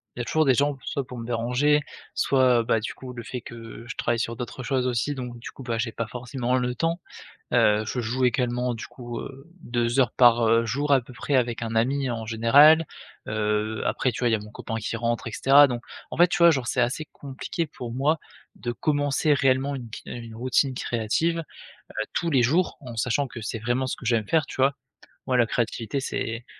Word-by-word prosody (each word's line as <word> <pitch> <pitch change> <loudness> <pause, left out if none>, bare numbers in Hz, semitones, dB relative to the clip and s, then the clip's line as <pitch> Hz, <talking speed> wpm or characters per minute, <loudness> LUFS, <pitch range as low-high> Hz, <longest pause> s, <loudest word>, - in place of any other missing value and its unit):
il - - -9
y - - 0
a - - -7
toujours 155 +5 +2
des 130 -3 +4
gens 145 +1 +1
soit 140 -2 -3
pour 125 - -8
me 115 - -6
déranger, 125 +6 +2 0.3
soit, 130 -3 +3
bah, 115 0 +2
du 110 - -4
coup 130 -1 -9
le 120 -1 -7
fait 125 - -5
que 115 0 -10
je - - -6
travaille 115 - 0
sur 115 0 -2
d'autres 125 +2 -6
choses 130 -1 0
aussi 125 +4 0
donc, 125 -2 -6
du - - -8
coup, 135 - -11
bah, 120 -2 -2
j'ai 115 0 -1
pas 115 - -3
forcément 125 +1 -2
le 125 -1 -1
temps, 165 +5 0 0.5
heu, 105 0 +4
je 125 - -3
joue 125 +3 0
également 125 0 0
du 115 - -7
coup, 120 -2 -7
heu, 135 +2 -9
2 120 +1 0
heures 130 - +3
par, 120 -2 +5
heu, 115 +1 +4
jour 145 +6 -1
à 135 - +4
peu 125 - -13
près 130 +5 -2
avec 120 -2 +1
un 115 0 -4
ami 130 +4 +1
en 115 -1 -4
général. 140 +9 +6 0.4
Heu, 110 0 -1
après, 130 - +1
tu - - -6
vois? 120 -2 +2
Il - - +1
y - - +6
a - - -3
mon 105 +1 -11
copain 115 - -6
qui 110 +1 -3
rentre 120 +1 -1
et - - -5
cetera 140 +5 +6
donc 120 -2 -3 0.3
en - - -5
fait, 175 +1 +7
tu 175 - -2
vois? 170 0 +8
Genre, 130 -6 -1
c'est 125 - +1
assez 125 +6 -1
compliqué 140 +4 -4
pour 125 -5 -7
moi 150 +5 +1 0.4
de 120 - -4
commencer 145 +2 +1
réellement 135 0 +2
une 120 -4 -7
qui 110 - -8
une 115 -2 -7
routine 130 +3 +1
créative, 125 +10 0 0.4
heu, 110 - -6
tous 170 - 0
les 130 -4 +4
jours 165 +9 +2
en 120 -4 -9
sachant 130 +4 +1
que 120 -2 -9
c'est 110 +1 -4
vraiment 120 +4 0
ce - - -2
que - - -11
j'aime 115 -3 +1
faire, 160 -3 +2
tu - - -9
vois? 135 +1 +4 0.5
Moi 130 - +1
la 120 -2 +4
créativité, 115 +2 -2
c'est 115 -3 -3
125 Hz, 230 wpm, -25 LUFS, 115-135 Hz, 0.5 s, vois